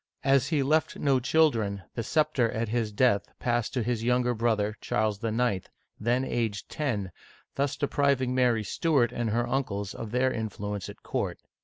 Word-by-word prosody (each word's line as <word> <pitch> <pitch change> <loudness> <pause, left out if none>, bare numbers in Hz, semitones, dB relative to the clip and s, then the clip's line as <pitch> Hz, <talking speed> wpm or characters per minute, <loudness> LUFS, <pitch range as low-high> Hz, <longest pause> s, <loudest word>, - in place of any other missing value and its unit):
As 135 -1 +3
he 150 -4 +1
left 155 +3 +1
no 135 -3 +2
children, 115 - +2
the 115 - -2
scepter, 130 -3 +1
at 115 0 -2
his 115 -2 0
death, 105 -1 +2
passed 120 0 -1
on 120 - +1
to - - -6
his 120 -2 -1
younger 125 0 +2
brother, 110 -2 0
Charles 110 -1 -1
IX:, 115 -4 0 0.3
then 120 +4 +1
aged 110 -6 -2
ten, 110 -11 -2 0.4
thus 140 +1 0
depriving 140 -3 +1
Mary 125 -4 +2
Stuart 135 - +1
and 120 -2 -2
her 120 +2 0
uncles 105 -7 -2
of 115 - -6
their 125 +3 +1
influence 105 -3 -4
at - - -12
court. - - -2
120 Hz, 170 wpm, -28 LUFS, 110-130 Hz, 0.4 s, As